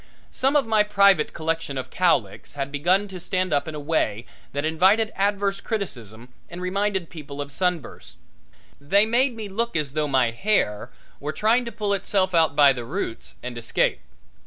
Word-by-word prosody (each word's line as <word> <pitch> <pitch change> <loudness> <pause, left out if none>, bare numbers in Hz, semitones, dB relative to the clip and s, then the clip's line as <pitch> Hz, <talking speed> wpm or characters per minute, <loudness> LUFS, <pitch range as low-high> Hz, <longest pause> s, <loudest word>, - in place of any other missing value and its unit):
Some 270 +3 0
of 290 - +4
my 220 -1 +3
private 200 -5 +4
collection 160 -3 -3
of 130 - -5
cowlicks 145 - 0
had 140 -1 -4
begun 180 +8 +1
to 185 -1 -8
stand 185 -1 -1
up 145 - +1
in 155 - -5
a - - -5
way 145 -7 -1 0.3
that 145 +2 -2
invited 190 +8 +3
adverse 200 0 0
criticism 120 - -5 0.2
and 175 - -8
reminded 190 -1 -1
people 145 -4 -9
of 145 0 -5
sunbursts. 180 0 -3 0.6
They 195 +9 +3
made 245 +3 +2
me 220 -2 -6
look 230 +3 -2
as 150 -4 -1
though 155 0 0
my 130 -4 +2
hair 115 - 0 0.3
were 145 +2 -3
trying 225 +8 +2
to 235 - -5
pull 210 -2 -1
itself 190 -1 0
out 160 -4 +3
by 145 -2 +6
the 125 -2 -6
roots 130 - -5
and 125 0 -5
escape. 115 - 0
175 Hz, 180 wpm, -24 LUFS, 140-205 Hz, 0.6 s, by